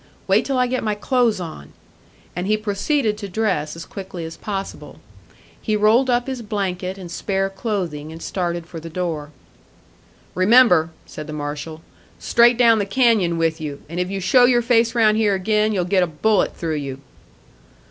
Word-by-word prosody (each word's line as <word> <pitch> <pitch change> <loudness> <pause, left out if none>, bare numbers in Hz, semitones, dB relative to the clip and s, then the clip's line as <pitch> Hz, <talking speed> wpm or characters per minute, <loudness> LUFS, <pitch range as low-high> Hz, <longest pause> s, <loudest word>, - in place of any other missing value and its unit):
"Wait 195 +3 +3
till 270 -2 -1
I 250 - +3
get 255 +1 -2
my 215 -1 0
clothes 235 -1 +1
on." 160 - -8 0.6
And 180 +2 -3
he 215 +1 +2
proceeded 215 +2 -1
to 200 -2 -6
dress 180 -7 -1
as 165 - -8
quickly 190 -4 -7
as 160 - -8
possible; 195 -2 -6 0.6
he 215 - 0
rolled 220 +5 +3
up 245 0 +2
his 260 -2 -4
blanket 190 -3 -3
and 180 -3 -9
spare 195 +2 -1
clothing, 185 -8 -4
and 165 - -9
started 175 -2 -3
for 170 -1 -8
the 165 +1 -9
door. 160 -4 -3 1.0
"Remember," 185 -4 +5 0.2
said 155 -1 -9
the 155 - -6
marshal, 150 +2 -5 0.4
"straight 235 0 +4
down 230 -2 +5
the 200 - 0
canyon 205 -7 +2
with 165 0 0
you, 145 -2 -6
and 170 +3 -5
if 180 0 -1
you 195 0 -3
show 245 +7 +5
your 245 -1 +3
face 230 -1 +2
round 215 -2 +4
here 210 -3 +2
again, 215 +3 +1
you'll 185 -4 0
get 185 +1 +2
a 180 - +2
bullet 200 +7 +1
through 160 -2 -2
you." 135 -2 -5
195 Hz, 180 wpm, -21 LUFS, 165-225 Hz, 1.0 s, Remember